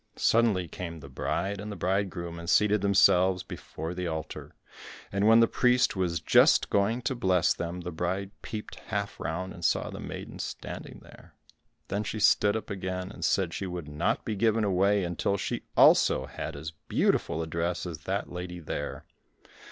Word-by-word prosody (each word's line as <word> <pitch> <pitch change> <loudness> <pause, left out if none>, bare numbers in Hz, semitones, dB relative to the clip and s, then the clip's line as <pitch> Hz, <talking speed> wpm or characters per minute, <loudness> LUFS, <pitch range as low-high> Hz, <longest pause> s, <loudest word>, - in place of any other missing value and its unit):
Suddenly 110 -6 +2
came 85 -1 -7
the 70 -2 -11
bride 95 +9 -2
and 105 -1 -6
bridegroom, 90 -3 -2
and 85 0 -6
seated 105 -1 +4
themselves 95 -2 +4
before 80 +2 -7
the 90 0 -3
altar, 80 -2 -6 0.6
and 100 +1 +1
when 115 +1 +7
the 115 - +5
priest 125 -1 +3
was 90 -3 0
just - - +4
going 110 +5 +1
to 135 - 0
bless 95 -8 +2
them, 85 +1 -5
the 90 +1 -5
bride 95 +4 -2
peeped 105 -1 -7
half 100 -1 -3
round 90 +3 -3
and 85 - -11
saw - - +1
the - - -7
maiden - - -7
standing - - -7
there. - - -17 0.5
Then 100 +2 -1
she 110 +1 -4
stood 105 0 +4
up 110 - -4
again, 95 -1 -4
and - - -9
said 90 -4 +1
she 95 +3 -3
would 90 -4 -6
not 75 +3 -1
be 110 - -2
given 110 +1 +2
away 100 0 +2
until 90 +3 -1
she - - -3
also 65 - +6
had 70 - -6
as 80 +3 -6 0.2
beautiful 80 - +1
a - - -3
dress 85 +3 -2
as 85 -4 -6
that - - -2
lady 90 0 -6
there. 80 - -5
95 Hz, 175 wpm, -28 LUFS, 85-100 Hz, 0.6 s, when